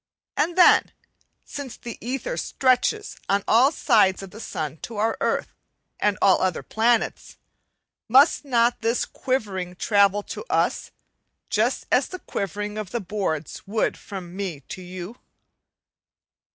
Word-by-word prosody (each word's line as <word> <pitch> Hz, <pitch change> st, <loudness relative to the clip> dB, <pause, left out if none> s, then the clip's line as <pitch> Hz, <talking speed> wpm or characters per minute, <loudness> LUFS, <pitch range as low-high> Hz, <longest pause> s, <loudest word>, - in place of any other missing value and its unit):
And 335 Hz, +4 st, 0 dB
then, 360 Hz, -, +6 dB, 0.5 s
since 280 Hz, -4 st, -7 dB
the 235 Hz, -, -8 dB
ether 270 Hz, -, -3 dB
stretches 275 Hz, -, +1 dB
on 200 Hz, 0 st, +2 dB
all 250 Hz, +6 st, +5 dB
sides 210 Hz, -, +3 dB
from 195 Hz, -1 st, -9 dB
the 215 Hz, -, -11 dB
sun 155 Hz, -8 st, -4 dB
to 225 Hz, +6 st, -8 dB
our 220 Hz, +2 st, +1 dB
earth -, -, -1 dB, 0.5 s
and 205 Hz, -2 st, +1 dB
all 190 Hz, -, +5 dB
other 185 Hz, -3 st, 0 dB
planets, 230 Hz, +1 st, 0 dB, 0.7 s
must 270 Hz, +8 st, +5 dB
not 240 Hz, -4 st, +2 dB
this 230 Hz, +2 st, +1 dB
quivering 195 Hz, -9 st, -3 dB
travel 200 Hz, +1 st, +3 dB
to -, -, -7 dB
us, -, -, 0 dB, 0.6 s
just -, -, +1 dB
as -, -, +3 dB
the 370 Hz, -, -7 dB
quivering 205 Hz, -, -4 dB
of 210 Hz, -3 st, -5 dB
the 235 Hz, -, -2 dB
boards 185 Hz, -6 st, -3 dB
would 215 Hz, +2 st, 0 dB
from 185 Hz, -3 st, -9 dB
me 185 Hz, -7 st, -4 dB
to 185 Hz, -, -7 dB
you? 180 Hz, +5 st, -8 dB
210 Hz, 140 wpm, -24 LUFS, 190-245 Hz, 0.7 s, then